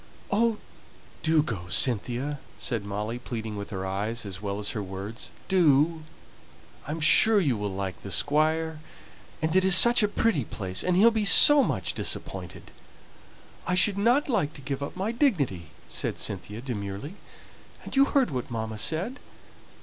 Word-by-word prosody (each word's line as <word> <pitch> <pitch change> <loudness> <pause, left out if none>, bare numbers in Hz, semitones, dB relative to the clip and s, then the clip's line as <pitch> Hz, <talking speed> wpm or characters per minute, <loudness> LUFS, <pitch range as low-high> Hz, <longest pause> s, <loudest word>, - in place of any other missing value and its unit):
"Oh, 225 +2 +1 0.6
do 160 -2 +2
go, 100 - -6
Cynthia!" 125 - 0 0.2
said 115 -4 -2
Molly, 105 +4 -5
pleading 110 -3 -6
with 100 0 -7
her 95 -1 -5
eyes 105 +4 -4
as 100 -1 -8
well 100 -1 -4
as 105 0 -3
her 110 - -4
words. 100 +4 -7 0.2
"Do; 160 -3 +2 0.9
I - - -4
am 160 - -4
sure 210 +7 +5
you 145 -10 0
will 105 -1 -4
like 95 -1 -5
the 100 - -8
Squire; 155 +5 +1 0.6
and 160 +2 0
it 185 - +4
is 190 -1 +6
such 235 +5 +7
a 210 - +3
pretty 205 - 0
place, 95 -4 -5
and 180 -1 0
he'll 220 +6 +5
be 220 -1 -1
so 285 - +9
much - - -2
disappointed." - - -4 1.0
"I 180 - 0
should 200 +2 +3
not 240 +7 +2
like 185 - -1
to 140 - -11
give 135 +1 -5
up 140 - -6
my 195 +4 -2
dignity," 150 - -1 0.2
said - - -4
Cynthia, 105 +3 -5
demurely. 105 - -6 0.7
"And - - -9
you 275 0 +5
heard 270 - +1
what 125 -1 -4
mamma 110 -2 -5
said!" 180 - -1
140 Hz, 165 wpm, -26 LUFS, -, 1.0 s, so